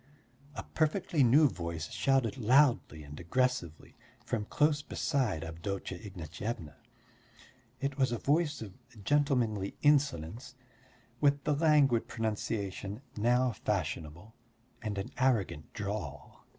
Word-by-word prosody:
a - - -5
perfectly 160 0 0
new 140 +6 +6
voice 85 - -5
shouted 135 -5 +1
loudly 125 - +3
and 75 0 -10
aggressively 90 -3 -1 0.3
from 110 -4 -2
close 150 +5 +2
beside 130 - -1
Avdotya 90 +3 -5
Ignatyevna. 90 -2 -6 1.1
It 140 0 -3
was 130 -2 +3
a 120 - 0
voice 150 0 +1
of 100 -4 -9 0.3
gentlemanly 125 -7 +1
insolence, 130 - +1 0.6
with 140 -1 +3
the 150 - +1
languid 145 -6 +4
pronunciation 105 0 -3
now 125 +3 +2
fashionable 90 -1 -3 0.5
and 105 -3 -3
an 95 - -4
arrogant 115 - +1
drawl. 100 -8 -6
115 Hz, 110 wpm, -31 LUFS, 95-140 Hz, 1.1 s, new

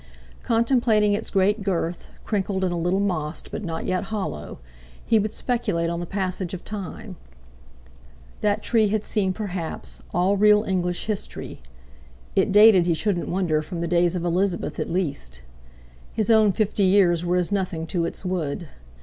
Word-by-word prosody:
Contemplating 230 -3 +2
its 205 - -2
great 200 +2 +2
girth—crinkled 190 +2 -2
and 180 -1 0
a - - -1
little 175 +3 0
mossed, 175 -6 -2
but - - -5
not 165 -3 -4
yet 185 +1 -1
hollow—he 75 - -4
would 210 0 -1
speculate 170 -10 -1
on 170 - -3
the 175 - -5
passage 185 -1 -3
of 180 - -10
time. 200 -2 -7 1.2
That 210 0 +1
tree 225 -3 +3
had 210 +1 0
seen, 195 -4 0
perhaps, 185 -5 -5
all 185 +3 +2
real 210 +1 +5
English 180 -3 -1
history; 210 - -5 0.7
it 195 +1 +2
dated, 205 -3 +7
he 170 - +2
shouldn't 180 +1 -1
wonder, 175 -4 +1
from 170 +2 -6
the 170 - -1
days 175 +1 +2
of 175 -1 -2
Elizabeth 180 +1 -1
at - - -2
least. 140 - -3 0.7
His 220 0 0
own 215 -2 +5
fifty 210 0 -1
years 185 -3 +4
were 175 +1 +1
as 180 +2 0
nothing 185 -5 -1
to 170 0 -1
its 170 - -6
wood. 170 -3 -3
185 Hz, 160 wpm, -24 LUFS, 170-205 Hz, 1.2 s, dated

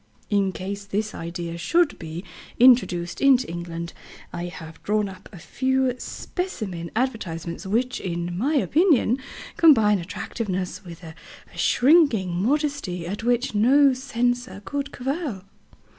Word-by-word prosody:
In 200 -2 +2
case 200 +2 -5
this 210 +2 -2
idea 170 0 -5
should 320 - +2
be 165 +1 -6 0.4
introduced 230 -9 +4
into 265 -2 +5
England, 170 0 -6 0.4
I 175 0 -4
have 165 -2 -9
drawn 210 0 0
up 190 -1 -11
a 190 - -11
few 260 - 0
specimen 200 - -5
advertisements 180 -8 -3
which, 245 +6 0
in 175 -1 -3
my 270 - 0
opinion, 290 - +3 0.4
combine 220 - +6
attractiveness 185 +2 -4
with 170 -2 -11
a 160 -1 -9 0.4
shrinking 255 - +4
modesty 275 - -1
at 200 +5 -4
which 245 0 +1
no 265 +6 +5
censor 245 -5 -2
could 280 +5 -3
cavil." 265 - -3
210 Hz, 125 wpm, -24 LUFS, 175-260 Hz, 0.4 s, combine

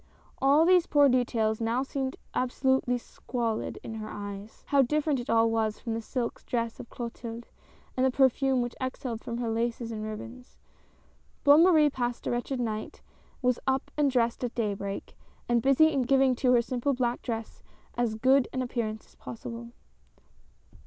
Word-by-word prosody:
All 285 +4 +5
these 360 -1 +5
poor 290 -1 +5
details 230 -3 +1
now 230 +3 +1
seemed 270 -1 -3 0.2
absolutely 255 0 +1
squalfd 235 -2 -4
in 225 - -6
her 215 -1 -6
eyes. 205 +1 -8
How 280 -1 +5
different 295 +1 +1
it 245 - -7
all 225 0 +4
was 220 -1 0
from 230 - -4
the 225 - -2
silk 235 +1 -4
dress 230 -2 -2
of 235 - -9
Clotilde 235 -1 -7 0.5
and 255 - +1
the 265 - +4
perfume 265 0 +3
which 240 - -4
exhaled 255 -3 -4
from 235 - -4
her 235 -2 -2
laces 230 +1 -2
and 215 -1 -5
ribbons. 225 +3 -8 0.9
Bonne 290 +2 +7
Marie 315 -5 +5
passed 245 -2 -3
a - - -1
wretched 245 +2 -2
night, 215 -3 -4 0.4
was 250 -1 +2
up 265 0 0
and 295 -2 +3
dressed 240 -2 0
at 245 - -3
daybreak, 200 -3 -3 0.3
and 240 -1 +2
busy 275 +5 +5
in 275 -3 +1
giving 265 +1 +3
to 255 -1 +2
her 240 -1 +4
simple 255 +2 -1
black 245 -1 -1
dress 225 -2 -5 0.3
as 235 -2 0
good 260 +3 +4
an 255 - -2
appearance 220 -3 -3
as - - -24
possible. 235 0 -8
245 Hz, 170 wpm, -28 LUFS, 230-265 Hz, 0.9 s, Bonne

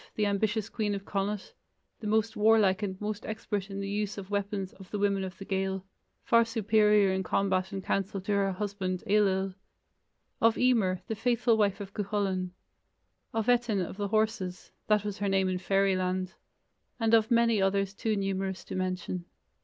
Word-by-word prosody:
the 210 - +1
ambitious 210 +1 0
queen 210 -3 -1
of 195 0 -6
Connacht, 200 0 -3 0.5
the 215 - -5
most 220 +1 +1
warlike 210 -2 +4
and 190 -2 -3
most 210 0 -4
expert 210 -2 -3
in 195 0 -5
the 195 - -3
use 205 +1 -2
of 200 0 -8
weapons 200 -1 -2
of 190 -2 -14
the 210 - -3
women 200 -1 +1
of 185 -2 -6
the 195 - -8
Gael 190 -1 -2 0.4
far 230 0 +5
superior 210 -3 +3
in 190 - 0
combat 190 0 0
and 195 -1 -4
counsel 195 +1 -1
to 195 - -3
her 200 -1 +2
husband, 190 -2 -3
Ailill; 195 -2 +2 0.9
of 230 0 +4
Emer, 215 -8 +2
the - - -3
faithful 235 +1 +2
wife 205 -2 +1
of 200 -1 -7
Cuchulainn; 195 -3 -1 0.8
of 225 -1 -1
Etain 240 -4 +3
of - - -8
the 205 -1 -1
Horses 215 -4 -1 0.2
(that 210 -1 +3
was 205 -1 -4
her 200 -1 0
name 190 -1 +2
in 185 -1 -1
Fairyland); 185 -1 +1 0.7
and 225 -1 +1
of 220 -1 +5
many 230 -3 +3
others 195 0 +1
too 215 +1 -1
numerous 195 -1 -2
to - - -8
mention. 185 -1 -3
200 Hz, 175 wpm, -29 LUFS, 190-215 Hz, 0.9 s, far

